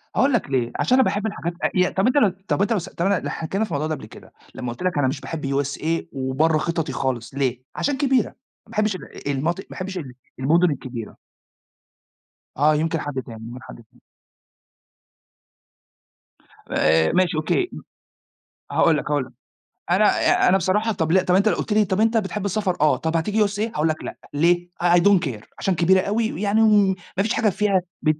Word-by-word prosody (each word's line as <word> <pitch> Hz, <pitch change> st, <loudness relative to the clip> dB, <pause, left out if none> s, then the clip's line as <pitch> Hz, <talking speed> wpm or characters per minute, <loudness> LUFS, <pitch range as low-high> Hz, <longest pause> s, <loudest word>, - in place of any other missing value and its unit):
هاقول 275 Hz, +1 st, +3 dB
لك 215 Hz, -, 0 dB
ليه، 125 Hz, -3 st, 0 dB
عشان 255 Hz, -, +3 dB
أنا -, -, +6 dB
باحب 205 Hz, -1 st, -1 dB
الحاجات 175 Hz, -5 st, -4 dB
آه، -, -, +2 dB
إيه، 180 Hz, -1 st, +3 dB
طَب 190 Hz, +5 st, +1 dB
أنت 255 Hz, -, +2 dB, 0.3 s
طَب 145 Hz, -, +1 dB
أنت 205 Hz, +3 st, +2 dB
لو 215 Hz, -, +1 dB
سا 175 Hz, -, -9 dB
طَب 170 Hz, -, -2 dB
أنا 195 Hz, -2 st, 0 dB
حكينا 190 Hz, +6 st, -2 dB
في 220 Hz, -, -4 dB
الموضوع 150 Hz, +2 st, -1 dB
ده 155 Hz, -, -1 dB
قبل 135 Hz, -, -10 dB
كده، 110 Hz, -, -15 dB, 0.2 s
لمّا 120 Hz, -1 st, -4 dB
قلت 150 Hz, -, -9 dB
لك 185 Hz, -4 st, 0 dB
أنا 145 Hz, -2 st, +2 dB
مش 135 Hz, -, -3 dB
باحب 160 Hz, -3 st, -5 dB, 0.2 s
USA 155 Hz, +4 st, -2 dB
وبرَّه 135 Hz, +4 st, +1 dB
خططي 165 Hz, -1 st, -2 dB
خالص 125 Hz, -3 st, -3 dB
ليه؟ 130 Hz, -3 st, -1 dB
عشان 285 Hz, -1 st, -1 dB
كبيرة، 265 Hz, -5 st, +2 dB
ما -, -, -22 dB, 0.4 s
باحبش 215 Hz, -2 st, 0 dB
ال 170 Hz, -, -10 dB
المناطق 160 Hz, +7 st, -1 dB
ما -, -, -29 dB
باحبش 185 Hz, 0 st, -6 dB
ال 140 Hz, -8 st, -6 dB, 0.3 s
المدن 165 Hz, +6 st, +3 dB
الكبيرة. 125 Hz, -5 st, -6 dB, 1.4 s
آه، 150 Hz, +3 st, +4 dB
يمكن 160 Hz, +2 st, 0 dB
حد 145 Hz, -3 st, -4 dB
تاني، 115 Hz, -1 st, -10 dB
يمكن 125 Hz, +2 st, -9 dB
حد -, -, -10 dB
تاني. 110 Hz, -, -28 dB, 2.7 s
آآ 80 Hz, +1 st, +3 dB
ماشي 180 Hz, -3 st, +2 dB
أوكي، 355 Hz, -, 0 dB, 1.0 s
هاقول 160 Hz, -2 st, +3 dB
لك 150 Hz, -, -4 dB
هاقول 145 Hz, -3 st, +1 dB
لك، 125 Hz, -, -16 dB, 0.6 s
أنا 195 Hz, +4 st, +4 dB, 0.2 s
ي -, -, 0 dB, 0.3 s
أنا 190 Hz, -, +5 dB
بصراحة 205 Hz, +5 st, +1 dB
طَب 160 Hz, -6 st, -1 dB
لأ، 190 Hz, +2 st, +5 dB
طَب 180 Hz, -, -1 dB
لو 185 Hz, -, +6 dB
أنت 205 Hz, +2 st, +3 dB
قلُت 210 Hz, -, -1 dB
لي، 215 Hz, 0 st, +4 dB
طَب 190 Hz, +1 st, -1 dB
أنت 225 Hz, +1 st, +3 dB
بتحب 210 Hz, -1 st, -2 dB
السفر؟ 195 Hz, -2 st, -1 dB
آه، 150 Hz, -, +4 dB
طَب 160 Hz, +1 st, -1 dB
هتيجي 210 Hz, +5 st, +1 dB
USA؟ 205 Hz, +1 st, -6 dB, 0.2 s
هاقول 150 Hz, +2 st, +1 dB
لك 155 Hz, -, -3 dB
لأ، -, -, -7 dB, 0.2 s
ليه؟ 175 Hz, +4 st, +2 dB
I 175 Hz, 0 st, +5 dB
Don't 195 Hz, +2 st, +5 dB
Care 110 Hz, -5 st, -6 dB, 0.2 s
عشان 190 Hz, -, 0 dB
كبيرة 185 Hz, +3 st, +4 dB
أوي، 220 Hz, +3 st, -1 dB
ويعني 210 Hz, +2 st, +1 dB
وم 205 Hz, -3 st, +4 dB, 0.2 s
مافيش 210 Hz, +4 st, +1 dB
حاجة 220 Hz, -, +2 dB
فيها 195 Hz, 0 st, +1 dB, 0.2 s
بت 155 Hz, -1 st, +1 dB
175 Hz, 200 wpm, -22 LUFS, 145-200 Hz, 2.7 s, أنا